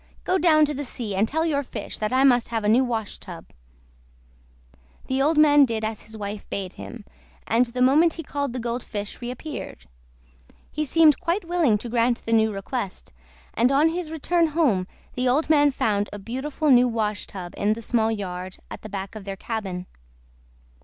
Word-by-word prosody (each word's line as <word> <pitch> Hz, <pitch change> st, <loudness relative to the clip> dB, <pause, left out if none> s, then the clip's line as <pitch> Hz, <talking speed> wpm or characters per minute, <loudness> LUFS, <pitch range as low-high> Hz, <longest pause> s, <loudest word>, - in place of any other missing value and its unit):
"Go 370 Hz, +1 st, +1 dB
down 310 Hz, -2 st, +5 dB
to 295 Hz, -, -3 dB
the 290 Hz, +1 st, -4 dB
sea 235 Hz, -5 st, -5 dB
and 200 Hz, +3 st, +2 dB
tell 320 Hz, +5 st, 0 dB
your 290 Hz, -4 st, +1 dB
fish 270 Hz, -, -7 dB
that 215 Hz, 0 st, -1 dB
I 260 Hz, +1 st, +3 dB
must 245 Hz, -3 st, +4 dB
have 225 Hz, -2 st, -2 dB
a -, -, 0 dB
new 235 Hz, +5 st, +5 dB
washtub." 215 Hz, -7 st, -5 dB, 1.5 s
The 265 Hz, +1 st, 0 dB
old 300 Hz, +3 st, +2 dB
man 295 Hz, -1 st, +7 dB
did 225 Hz, -4 st, 0 dB
as 220 Hz, -1 st, -4 dB
his 220 Hz, 0 st, -9 dB
wife 205 Hz, 0 st, -6 dB
bade 190 Hz, -2 st, -4 dB
him, 235 Hz, -4 st, -9 dB, 0.4 s
and 235 Hz, +2 st, +2 dB
the 250 Hz, +2 st, 0 dB
moment 310 Hz, +6 st, +5 dB
he 330 Hz, -, -6 dB
called 285 Hz, -2 st, -3 dB
the 250 Hz, -, -4 dB
Gold 240 Hz, +1 st, -3 dB
Fish 205 Hz, 0 st, -6 dB
reappeared. 245 Hz, -, -7 dB, 0.9 s
He 305 Hz, 0 st, -2 dB
seemed 310 Hz, +1 st, +5 dB
quite 345 Hz, +3 st, -1 dB
willing 335 Hz, -11 st, +2 dB
to 225 Hz, -, -7 dB
grant 235 Hz, +1 st, +1 dB
the 230 Hz, -, 0 dB
new 220 Hz, -1 st, +4 dB
request, 200 Hz, 0 st, -5 dB, 0.4 s
and 245 Hz, +3 st, +3 dB
on 290 Hz, +4 st, +4 dB
his 340 Hz, -1 st, -4 dB
return 330 Hz, +2 st, +1 dB
home 280 Hz, -, +1 dB, 0.3 s
the 250 Hz, 0 st, 0 dB
old 295 Hz, +5 st, +2 dB
man 290 Hz, -1 st, +5 dB
found 205 Hz, -6 st, 0 dB
a 205 Hz, -, -6 dB
beautiful 265 Hz, +8 st, -2 dB
new 250 Hz, 0 st, +6 dB
washtub 210 Hz, -5 st, -3 dB
in 210 Hz, +1 st, +1 dB
the 230 Hz, -, -7 dB
small 225 Hz, -1 st, +1 dB
yard 185 Hz, -3 st, -5 dB
at -, -, -7 dB
the 215 Hz, -, -9 dB
back 195 Hz, -1 st, -5 dB
of 215 Hz, -2 st, -8 dB
their 195 Hz, 0 st, -6 dB
cabin. 190 Hz, -5 st, -4 dB
240 Hz, 190 wpm, -24 LUFS, 210-290 Hz, 1.5 s, man